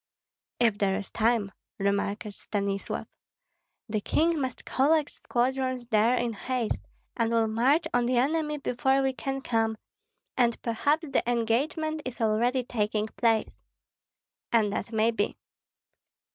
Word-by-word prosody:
"If 225 -4 +3
there 195 -1 +2
is 200 0 -5
time," 225 -3 +1 0.3
remarked 200 +1 -1
Stanislav. 200 -1 -3 0.8
"The 215 -1 -1
king 325 +6 +1
must 260 -1 -4
collect 295 +3 +2
squadrons 255 0 -1
there 225 +2 +4
in 240 -2 -1
haste, 235 +3 -2 0.3
and 230 -1 +1
will 230 -1 +3
march 250 +9 +2
on 240 0 +2
the 250 0 +2
enemy 300 +3 +1
before 265 0 +1
we 265 0 +1
can 270 +1 -3
come, 225 -3 0 0.6
and 235 -2 +2
perhaps 285 +8 +1
the 275 - +1
engagement 285 +7 0
is 255 -2 -6
already 235 +3 +2
taking 215 -2 -1
place." 225 -2 +1 0.9
"And 215 -3 +3
that 225 - -3
may 220 +1 +3
be." 205 -2 -1
235 Hz, 130 wpm, -28 LUFS, 220-265 Hz, 0.9 s, there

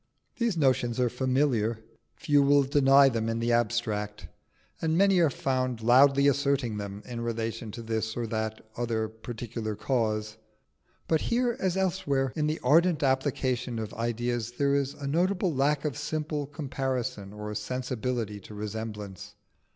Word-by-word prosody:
These 235 -7 0
notions 130 -5 +2
are 125 -2 +2
familiar: 125 -3 +1 0.4
few 145 -1 +3
will 140 0 +5
deny 135 0 +5
them 115 -3 0
in 115 - -1
the 115 +1 0
abstract, 110 -3 -1 0.5
and 160 0 +1
many 195 -1 +5
are 165 -3 +4
found 130 -3 -1
loudly 135 +4 +6
asserting 140 -5 +1
them 100 0 -6
in 120 -2 -5
relation 115 -1 -3
to 115 - -7
this 110 0 -2
or 120 - -1
the 110 -1 -2 0.2
other 115 -2 -1
particular 110 0 -6
case. 110 -3 -1 0.7
But 160 -1 +2
here 240 0 +1
as 190 -1 0
elsewhere, 145 -9 0
in 150 -1 0
the 155 +1 -1
ardent 160 +3 +4
application 130 -2 0
of 110 -1 -5
ideas, 120 0 -2
there 140 +2 +1
is 140 -1 0
a 145 - -7
notable 180 +4 +1
lack 140 +2 +1
of 150 - -1
simple 150 0 -3
comparison 130 -7 -3
or 105 0 -6
sensibility 115 -1 -3
to 105 +2 -12
resemblance. 105 -1 -6
125 Hz, 150 wpm, -28 LUFS, 110-140 Hz, 0.7 s, loudly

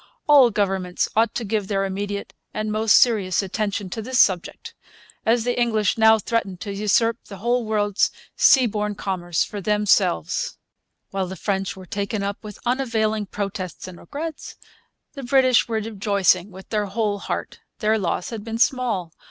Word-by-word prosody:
All 280 -5 +7
governments 195 -4 -1
ought 225 +1 +2
to 240 - -2
give 210 -1 -1
their 195 -1 0
immediate 200 +1 -4 0.2
and 215 0 -2
most 215 0 +3
serious 200 -7 +3
attention 200 0 -2
to 225 - -4
this 255 +3 -1
subject, 180 -3 +1 0.5
as 230 0 +3
the 245 0 0
English 220 -4 +2
now 220 0 +6
threaten 210 -3 -2
to 200 +3 -6
usurp 215 +3 +1
the 200 - -10
whole 240 +4 0
world's 205 -2 +1 0.3
seaborne 210 -5 +3
commerce 175 -4 -1
for 205 - -6
themselves. 210 - +1 0.5
While 195 -1 -2
the 190 - -6
French 195 -1 -2
were 190 -1 -11
taken 200 +2 -3
up 200 +2 -4
with 210 -2 -9
unavailing 220 -4 0
protests 195 -2 -5
and 180 -2 -10
regrets 310 - -7 0.6
the 275 - -7
British 255 -1 +3
were 230 - -3
rejoicing 200 -4 +1
with 190 0 -13
their 210 -2 -1
whole 205 0 -1
heart. - - -5 0.2
Their 220 -1 +1
loss 180 +1 -2
had 220 -3 -6
been 225 0 -4
small. 230 -9 0
210 Hz, 160 wpm, -23 LUFS, 195-230 Hz, 0.6 s, All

